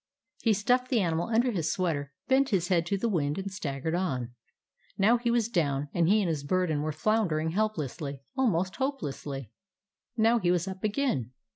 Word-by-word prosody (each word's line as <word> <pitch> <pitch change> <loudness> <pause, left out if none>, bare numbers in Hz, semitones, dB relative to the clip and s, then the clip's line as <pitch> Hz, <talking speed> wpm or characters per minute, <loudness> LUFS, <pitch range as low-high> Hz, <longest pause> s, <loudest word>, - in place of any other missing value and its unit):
He 225 - +3
stuffed 250 +5 +1
the 245 - +3
animal 170 -3 0
under 235 +2 +2
his 170 -7 -1
sweater, 150 -6 -1 0.2
bent 270 +1 +3
his 180 -4 +1
head 170 -2 +2
to 200 - 0
the 235 - 0
wind, 150 -8 0
and 195 0 -4
staggered 155 -4 -3
on. 130 -10 -1 0.6
Now 215 +5 +5
he 240 0 0
was 235 -2 +2
down, 145 -9 0
and 170 -1 +2
he 210 +1 +4
and - - 0
his 155 -4 -1
burden 160 -1 +1
were 155 +1 -1
floundering 160 -3 +1
helplessly, 155 - -2 0.2
almost 190 -9 +1
hopelessly. 145 - -3 0.7
Now 230 +2 +4
he 180 -4 +1
was 175 0 +1
up 190 0 -6
again. 205 - 0
180 Hz, 180 wpm, -29 LUFS, 150-220 Hz, 0.7 s, Now